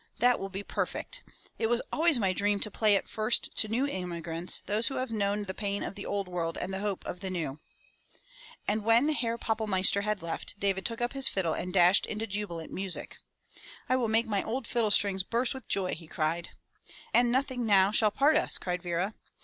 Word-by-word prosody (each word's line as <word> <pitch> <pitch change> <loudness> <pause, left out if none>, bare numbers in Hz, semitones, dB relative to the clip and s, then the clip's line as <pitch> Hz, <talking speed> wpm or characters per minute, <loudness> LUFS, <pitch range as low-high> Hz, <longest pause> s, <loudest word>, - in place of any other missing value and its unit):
That 245 0 +4
will 195 - -5
be 195 +1 -6
perfect! - - -4 0.4
It 225 - +1
was 240 +1 +2
always 325 -2 +4
my 195 -5 +1
dream 205 +2 +1
to 210 - 0
play 210 -1 +3
it - - -1
first 220 +2 0
to 215 - +5
new 235 +6 0
immigrants, 175 - -3
those 215 +3 +1
who 270 - -2
have 255 -2 -3
known 205 -1 -1
the^ 190 -1 -6
pain 200 -1 -2
of - - -4
the 200 - -7
old 200 -2 -2
world 170 -2 -3
and 190 - -4
the 190 - -2
hope 205 -2 -3
of 180 - -5
the 190 - -5
new." 160 -6 -4 1.1
And 210 +1 0
when 230 +6 +4
Herr 235 -6 -1
Pappelmeister 210 -4 +2
had 210 -3 -2
left, 170 +4 -4
Davidl 195 -1 0
took 230 0 -3
up 240 +2 0
his 270 -1 +6
fiddle 175 -5 -1
and 180 - -4
dashed 180 +1 +5
into 215 +1 -3
jubilant 195 -6 -5
music.l 190 -1 -3 0.7
"I 255 - +2
will 250 -3 +1
make 225 +2 +2
my 205 -3 0
old 245 +2 -3
fiddle 230 -2 +1
strings 200 -2 +3
burst 235 +7 -1
with| 260 -4 -9
joy!" 190 -2 0
he 165 0 -8
cried. 165 +2 -2 0.6
"And 240 0 +5
nothing 260 -2 0
now 195 -1 +5
shall 215 0 +4
part 290 +8 +3
us!" 315 - +1
cried 180 -1 -3
Vera. 175 +4 -2
205 Hz, 210 wpm, -29 LUFS, 185-230 Hz, 1.1 s, his